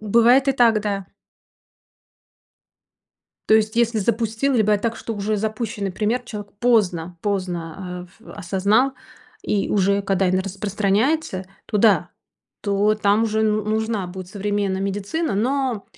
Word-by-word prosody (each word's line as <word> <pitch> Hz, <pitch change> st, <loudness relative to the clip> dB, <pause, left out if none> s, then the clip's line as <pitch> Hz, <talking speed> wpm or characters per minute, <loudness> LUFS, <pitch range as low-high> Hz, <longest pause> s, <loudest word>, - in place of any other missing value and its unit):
Бывает 235 Hz, +5 st, +4 dB
и -, -, +4 dB
так, 235 Hz, -4 st, +4 dB
да. 200 Hz, -2 st, -3 dB, 2.4 s
То -, -, +6 dB
есть 220 Hz, +1 st, +2 dB
если 235 Hz, -1 st, +2 dB
запустил, 225 Hz, +5 st, 0 dB
либо 215 Hz, -3 st, +3 dB
так, 230 Hz, +2 st, -2 dB
что 225 Hz, -, -5 dB
уже 210 Hz, +1 st, -1 dB
запущенный 215 Hz, -2 st, -3 dB
пример, 220 Hz, +6 st, -1 dB
человек 210 Hz, -4 st, -8 dB
поздно 180 Hz, -8 st, +1 dB
поздно, 180 Hz, -2 st, -4 dB
эв -, -, -19 dB
осознал, 205 Hz, +7 st, +1 dB, 0.5 s
и 200 Hz, -2 st, 0 dB
уже 200 Hz, 0 st, +2 dB
когда 195 Hz, -1 st, +1 dB
эн 185 Hz, +1 st, +2 dB
распространяется, 200 Hz, -, -1 dB, 0.2 s
то -, -, -2 dB
да, 210 Hz, -1 st, +4 dB, 0.5 s
то 205 Hz, +1 st, +2 dB
там 210 Hz, +1 st, +2 dB
уже 220 Hz, 0 st, 0 dB
ну 215 Hz, -1 st, +1 dB
нужна 220 Hz, -2 st, -1 dB
будет 180 Hz, 0 st, -8 dB
современная 200 Hz, -1 st, -2 dB
медицина, 205 Hz, -, -2 dB
но 250 Hz, 0 st, 0 dB
210 Hz, 130 wpm, -22 LUFS, 195-225 Hz, 2.4 s, То